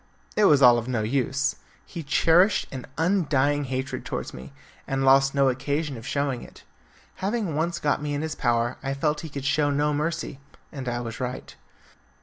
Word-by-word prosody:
It 210 - +4
was 145 -6 +5
all 120 -1 +8
of 115 - -7
no 120 -4 -1
use. 135 +4 0 0.3
He 170 - -7
cherished 165 +7 +3
an 130 -2 -7
undying 145 -5 +2
hatred 130 +1 -3
towards - - -5
me, 65 +1 -10 0.4
and 135 0 0
lost 135 +1 +5
no 140 -1 +4
occasion 140 +3 -1
of 115 +1 -9
showing 140 -4 -1
it. - - -14 0.5
Having 200 -4 -2
once 170 +3 0
got 145 -1 0
me 145 -1 -2
in 145 - -2
his 160 - -3
power 120 -1 0
I 135 0 -2
felt 150 +2 0
he 160 - -7
could 140 -2 -6
show 145 +1 +2
no 145 +1 +1
mercy, 150 -2 -2 0.3
and 135 -5 -5
I 120 0 -2
was 115 -2 -6
right. 125 0 -5
140 Hz, 185 wpm, -25 LUFS, 130-150 Hz, 0.5 s, all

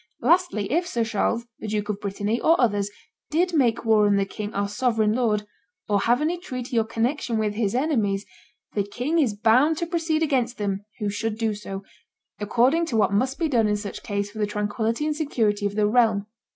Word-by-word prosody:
Lastly, 310 - +2
if 345 +4 +1
Sir 235 -9 0
Charles, 230 +1 -1
the - - -6
Duke 210 -1 -2
of 205 -1 -2
Brittany, 205 +3 -2
or 330 +2 +4
others, 205 -4 +2 0.4
did 350 +4 +1
make 245 -7 +2
war 215 -2 +4
on 205 - +3
the 200 0 +2
king 210 +1 -6
our 200 -1 -1
sovereign 220 -1 +1
lord, 220 -4 +1 0.4
or 205 -1 +2
have 240 +6 +2
any 335 +3 0
treaty 255 -7 -3
or - - +2
connection 235 +1 -1
with 215 -1 0
his 210 0 -1
enemies, 220 -9 0 0.5
the 205 - +1
king 245 +11 -1
is 245 -9 +2
bound 250 +9 +4
to 340 - -1
proceed 325 -2 0
against 255 -5 0
them 200 -1 -2
who 210 -3 -2
should 215 +1 -3
do 225 -1 0
so, 195 -1 -7 0.6
according 250 +10 +2
to 230 - -1
what 205 -2 +2
must 255 +7 +1
be 330 - 0
done 235 -7 +2
in 210 0 +1
such 205 0 -6
case 200 -1 -3
for 215 - -9
the 210 - +1
tranquillity 220 +5 -1
and 305 -1 0
security 220 -9 0
of 200 - -6
the 210 -1 +2
realm 220 -2 +3
225 Hz, 205 wpm, -24 LUFS, 205-260 Hz, 0.6 s, or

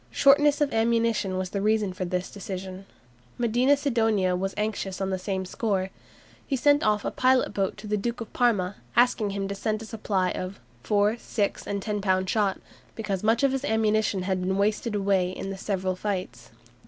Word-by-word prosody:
Shortness 290 +1 +4
of 290 - +1
ammunition 225 -4 +1
was 185 0 -3
the 200 - -2
reason 210 -2 +1
for 185 0 -3
this 180 +1 -3
decision. 190 -1 -7 0.5
Medina 245 +4 +3
Sidonia 225 -9 +1
was 195 +2 -2
anxious 210 -3 -2
on 195 0 -1
the 190 - -1
same 190 0 -3
score. 190 -1 -1 0.6
He 275 - 0
sent 290 +3 +4
off 210 -4 +1
a - - -1
pilot 255 -3 +2
boat 195 -2 -1
to - - -10
the 210 0 0
Duke 235 +4 -3
of 230 - -8
Parma, 205 -6 +1 0.2
asking 240 -3 +3
him 195 0 -3
to 200 - -3
send 215 +2 -2
him - - -8
a - - -12
supply 195 -5 -1
of 185 +2 -5 0.2
"four, 210 - +2
six, 205 -4 -2
and 200 -1 -3
ten 210 -2 -2
pound 185 -1 +1
shot," 200 -2 +1 0.4
"because 200 -4 -3
much 225 +4 +2
of 275 - +4
his 270 0 -2
ammunition 215 -5 +1
had 185 -1 -1
been 190 +1 0
wasted 210 +2 0
in 195 -2 0
the 195 - -5
several 190 -2 -1
fights." 190 -1 -4
205 Hz, 190 wpm, -26 LUFS, 190-225 Hz, 0.6 s, Shortness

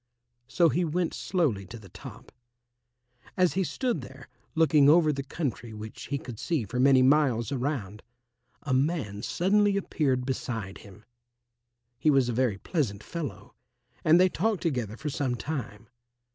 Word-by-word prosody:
So 165 +6 +3
he 180 - +1
went 170 +1 -1
slowly 150 - 0
to 115 - -9
the 105 -3 -13
top. 125 +4 -12 1.1
As 180 -2 +3
he 190 - +1
stood 240 - -2
there, 130 +1 -12 0.3
looking 155 -3 +5
over 155 -1 +5
the 140 - -3
country 135 -6 -4
which 105 +1 -8
he 140 - -1
could 120 -5 -9
see 155 -10 -1
for 125 +5 -4
many 130 0 +5
miles 135 -4 +3
around, 125 -7 -3 0.6
a 140 - -1
man 130 -7 0
suddenly 200 - +2
appeared 135 -9 0
beside 115 -7 -4
him. 105 +1 -15 0.9
He 155 - +3
was 135 -4 +3
a - - -1
very 120 -4 +1
pleasant 105 - -2
fellow, 125 - -6 0.5
and 165 +1 +6
they 185 - +6
talked 195 0 -1
together 120 - -2
for 150 +3 -4
some 135 -4 -1
time. 115 -5 -5
135 Hz, 155 wpm, -28 LUFS, 115-160 Hz, 1.1 s, and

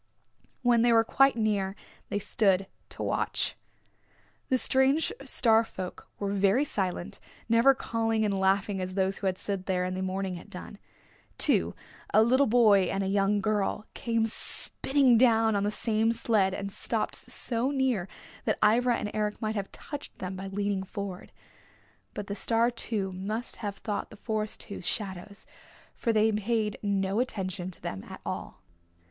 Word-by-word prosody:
When 240 -2 +4
they 240 0 +4
were 225 -1 +5
quite 270 +4 +4
near 205 -4 0 0.3
they - - -1
stood 195 -2 +2 0.2
to - - -6
watch. - - -1 0.9
The 260 - +3
strange 265 +4 +3
Star 230 -4 +4
folk 185 -5 -8
were 200 -1 -2
very 200 +7 +3
silent, 185 -8 0 0.3
never 230 +4 +5
calling 225 -3 0
and 200 -2 0
laughing 195 +1 +1
as 185 0 -4
those 190 0 0
who 195 - -1
had 185 -1 0
slid 195 -2 -4
there 180 -1 +1
in 185 - -2
the 185 - -3
morning 190 -1 -2
had 175 - -12
done. 200 +1 -9 0.6
Two, - - +2 0.4
a 215 - +6
little 260 +4 +4
boy 215 -5 +5
and 195 0 -1
a - - -1
young 200 +1 +2
girl, 210 0 0
came 230 -1 0
spinning 255 +2 +2
down 225 -3 +4
on 200 - +1
the 205 - +1
same 220 +1 +1
sled 210 -5 +1
and 200 0 -5
stopped 215 - -1
so 240 +2 -1
near 260 -9 0 0.4
that - - +1
Ivra 240 +3 +4
and 210 - -4
Eric 210 -1 -1
might 215 -1 -2
have 200 -3 -4
touched 290 -2 -8
them 185 0 -5
by 190 +1 -6
leaning 200 0 -1
forward. 190 -1 -6 0.8
But 205 - -4
the 200 - -4
Star 230 +3 +1
two 210 -5 -3
must 210 +6 -4
have 205 -2 -5
thought 205 -2 -4
the 215 - -13
Forest 215 0 -2
two 200 - -6
shadows, 195 +1 -4 0.5
for 230 - -1
they 220 0 +3
paid 215 0 -1
no 200 0 0
attention 185 -7 -3
to 185 - -15
them 95 0 -5
at - - -8
all. - - -6
210 Hz, 165 wpm, -28 LUFS, 195-230 Hz, 0.9 s, a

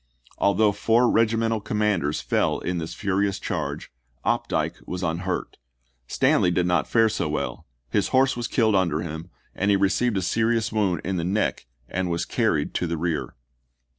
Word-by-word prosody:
Although 100 +2 +3
four 115 +4 +2
regimental 115 -1 +2
commanders 100 -8 0
fell - - +1
in 90 -1 -3
this 80 0 -5
furious 100 0 0
charge, - - -4 0.3
Opdycke - - -1
was 90 +1 -4
unhurt. 85 +3 -2 0.5
Stanley 90 - +3
did 90 0 +1
not 90 -3 +1
fare 115 -1 +4
so 105 -7 -1
well; 75 - -4 0.2
his - - +2
horse 135 +1 +3
was 120 -1 -3
killed 110 -3 +2
under 85 -5 +1
him 80 +1 -6 0.2
and 100 - 0
he 100 - +4
received 100 +3 +1
a 95 - -1
serious 115 +3 +1
wound 95 -7 +1
in 95 +1 -2
the 85 - -1
neck 95 -6 -1 0.2
and 90 0 -2
was 85 0 -1
carried - - 0
to 90 - -1
the 85 0 -2
rear. 80 -2 -2
95 Hz, 165 wpm, -24 LUFS, 85-110 Hz, 0.5 s, fare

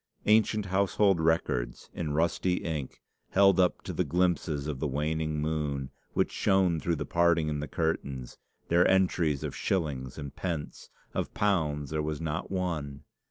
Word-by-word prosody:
Ancient 110 -1 +3
household 95 0 +2
records, 80 -7 0
in 75 -3 -3
rusty 85 +3 +1
ink, 75 -6 -4 0.3
held 95 0 +5
up 90 -1 +2
to - - -5
the - - +1
glimpses 85 -5 0
of 75 -4 -3
the 75 - 0
waning 75 +2 -1
moon, 75 -3 -2 0.2
which - - +1
shone 95 -4 +2
through 85 +1 0
the - - -4
parting 85 -2 +2
in 75 -1 -2
the 75 - -4
curtains, 70 -6 -3 0.3
their 85 +1 +4
entries 90 -6 +2
of - - -4
shillings 70 -8 -2
and 70 -3 -7
pence! 85 -5 -4 0.2
Of - - -3
pounds 75 -8 0
there 80 -1 0
was 75 -1 -3
not 80 +1 -3
one. 80 -7 -3
80 Hz, 160 wpm, -29 LUFS, 75-90 Hz, 0.3 s, held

